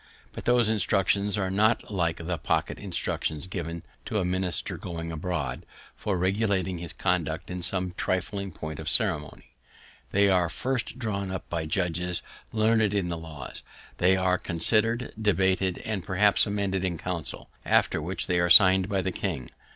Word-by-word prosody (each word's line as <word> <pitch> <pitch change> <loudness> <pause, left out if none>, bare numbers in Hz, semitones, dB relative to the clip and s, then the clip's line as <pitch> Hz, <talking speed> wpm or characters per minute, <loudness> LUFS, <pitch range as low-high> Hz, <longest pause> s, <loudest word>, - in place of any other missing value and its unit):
But - - -8
those 120 -2 +4
instructions 100 -1 +1
are 95 -2 -1
not 110 +3 +2
like 85 -3 0
the 85 -1 -2
pocket - - -1
instructions 80 +2 -3
given 85 -2 -5 0.2
to 110 - -2
a 95 - +1
minister 90 -1 -2
going 85 -1 -6
abroad, 80 -3 -3 0.3
for 100 -3 -2
regulating 95 -1 0
his 85 -1 -5
conduct - - -1
in 90 0 -4
some 90 +1 -1
trifling 100 +2 -2
point 80 -1 -7
of - - -3
ceremony. 75 0 -2 0.6
They 100 +1 +4
are 90 -3 +3
first 125 +4 -3
drawn 100 -6 -3
up 95 0 -5
by 80 -2 -2
judges 90 0 -1 0.3
learned 110 -1 +2
in 95 -3 0
the 85 - -2
laws; 80 -5 -8 0.4
they 95 +2 +4
are 90 0 +2
then - - -22
considered, 115 +8 +5
debated, 95 -2 +1
and 105 -5 -3
perhaps 100 +5 +3
amended 100 -2 -1
in 90 -3 -1
Council, 85 -2 -6
after - - +2
which 90 +5 -3
they 90 -1 +1
are 85 0 +2
signed 95 +1 +7
by 100 -3 0
the 95 - -1
king. 80 -11 -4
95 Hz, 165 wpm, -27 LUFS, 85-100 Hz, 0.6 s, signed